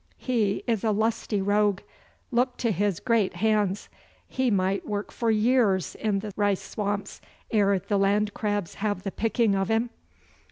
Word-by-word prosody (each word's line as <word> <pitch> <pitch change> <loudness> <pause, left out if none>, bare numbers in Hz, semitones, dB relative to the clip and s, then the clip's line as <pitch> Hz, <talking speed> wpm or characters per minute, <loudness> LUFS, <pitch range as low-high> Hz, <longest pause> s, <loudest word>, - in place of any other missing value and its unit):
He 220 -6 0
is 225 -5 0
a 225 - +2
lusty 215 -1 0
rogue. 205 -1 +2 0.5
Look 245 +1 +1
to 230 - 0
his 200 -1 0
great 225 -6 +1
hands. 205 0 +1 0.4
He 260 -1 0
might 195 -1 +1
work 205 -1 -3
for 235 - -1
years 215 -3 +2
in 205 -3 -1
the 210 -1 -6
rice 205 -2 +1
swamps 205 0 -4 0.3
ere 200 -2 +3
the 200 +2 -1
land 205 +1 +2
crabs 205 -4 -2
have 205 -3 -1
the 195 - -3
picking 225 0 +1
of 195 -1 0
him. 225 +2 +1
205 Hz, 160 wpm, -26 LUFS, 195-225 Hz, 0.5 s, ere